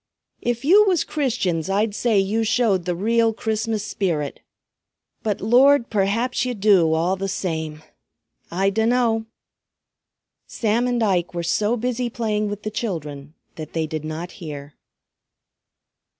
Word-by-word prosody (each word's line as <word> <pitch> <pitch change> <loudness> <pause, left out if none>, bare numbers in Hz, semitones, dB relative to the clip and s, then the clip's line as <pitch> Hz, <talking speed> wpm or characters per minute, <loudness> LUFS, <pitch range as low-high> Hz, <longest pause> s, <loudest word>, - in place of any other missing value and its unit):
If 240 +1 -2
you 395 +7 +7
was 365 -5 +2
Christians 205 - -1
I'd 205 +2 +1
say 225 0 +1
you 200 +4 +1
showed 220 -5 +1
the 180 -1 -1
real 225 +4 +2
Christmas 220 -1 -2
spirit. 165 -9 -2 0.8
But 210 -3 -2
Lord 250 +4 +4
perhaps 220 +5 0
ye 250 -1 -2
do, 195 -6 +4
all 170 +4 +1
the 195 +1 -3
same! 160 -5 -4 0.7
I 195 +3 +1
dunno!" 225 +1 +1 1.2
Sam 230 +2 0
and 245 -2 0
Ike 180 -4 0
were 170 - -2
so 210 +7 +1
busy 245 +1 -2
playing 215 -3 -1
with 205 0 -6
the 215 - -3
children 150 -9 -5 0.2
that 155 -1 -8
they 160 -1 0
did 155 0 -5
not 155 +3 -5
hear. 145 -3 -7
210 Hz, 135 wpm, -22 LUFS, 170-230 Hz, 1.2 s, you